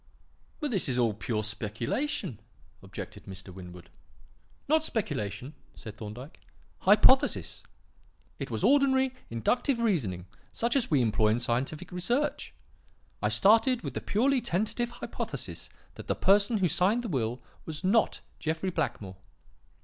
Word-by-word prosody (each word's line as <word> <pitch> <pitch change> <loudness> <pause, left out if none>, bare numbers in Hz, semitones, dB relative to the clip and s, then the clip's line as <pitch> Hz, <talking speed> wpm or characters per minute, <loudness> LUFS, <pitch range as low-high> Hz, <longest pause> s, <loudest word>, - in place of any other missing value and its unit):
"But 295 -3 -2
this 195 -6 +2
was 125 -2 0
all 115 -3 +2
pure 110 +1 -2
speculation," 110 - -3 0.4
objected - - -9
Mr. 95 -1 -9
Winwood. 90 -2 -11 0.8
"Not 310 +2 +4
speculation," 130 - -2 0.2
said 105 -1 -9
Thorndyke. 115 +7 -9 0.4
"Hypothesis. 260 +8 +4 0.8
It - - -4
was - - -3
ordinary 265 -2 +4 0.2
inductive 240 - +1
reasoning 135 - 0 0.3
such 235 +2 0
as 265 -4 +2
we 140 -5 +3
employ 110 -1 +2
in 110 +2 +2
scientific 130 +8 -2
research. 240 +12 -1 0.7
I - - +2
started 230 +4 +4
with - - -4
the - - -3
purely 255 +5 +2
tentative 220 +6 -1
hypothesis 240 0 -6 0.2
that - - -10
the - - +1
person 205 +3 +4
who 190 -3 +2
signed 195 +9 +2
the - - -3
will 125 - -1 0.3
was 155 +2 -6
not 210 +4 +2 0.2
Jeffrey 160 +4 -2
Blackmore. 105 - -3
175 Hz, 135 wpm, -29 LUFS, -, 0.8 s, Not